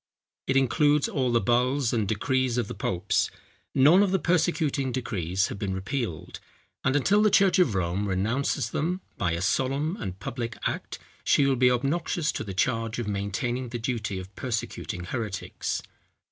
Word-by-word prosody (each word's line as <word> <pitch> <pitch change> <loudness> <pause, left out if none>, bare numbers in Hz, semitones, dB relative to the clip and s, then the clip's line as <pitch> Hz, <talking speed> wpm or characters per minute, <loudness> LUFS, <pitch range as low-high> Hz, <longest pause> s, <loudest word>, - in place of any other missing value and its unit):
It 135 - +2
includes 145 +2 +3
all 130 -3 0
the 120 - +4
bulls 125 +2 +1
and 110 -4 +1
decrees 130 +3 0
of 120 -4 0
the - - -5
popes. 90 +3 0 0.5
None 155 +8 +7
of 205 - +3
the 190 - +2
persecuting 160 -6 +1
decrees 95 -7 -1
have 100 - -6
been 95 -2 -2
repealed; 100 - -4 0.4
and 130 - +2
until 195 +9 +4
the 215 - +5
church 195 -2 +4
of 135 - +3
Rome 95 +3 0
renounces 115 +6 0
them 180 +5 -1 0.2
by 85 -3 +1
a 85 - -2
solemn 135 - 0
and 95 -3 -6
public 115 +3 -4
act, - - -3 0.3
she 140 - +4
will 135 -1 +3
be 125 0 +4
obnoxious 150 +5 0
to - - -4
the 100 -3 -6
charge 115 +1 0
of 120 -3 -3
maintaining 105 +5 -2
the 120 - -4
duty 110 -5 -2
of 95 +1 -8
persecuting 110 -6 -3
heretics. 105 0 -3
120 Hz, 170 wpm, -27 LUFS, 100-140 Hz, 0.5 s, None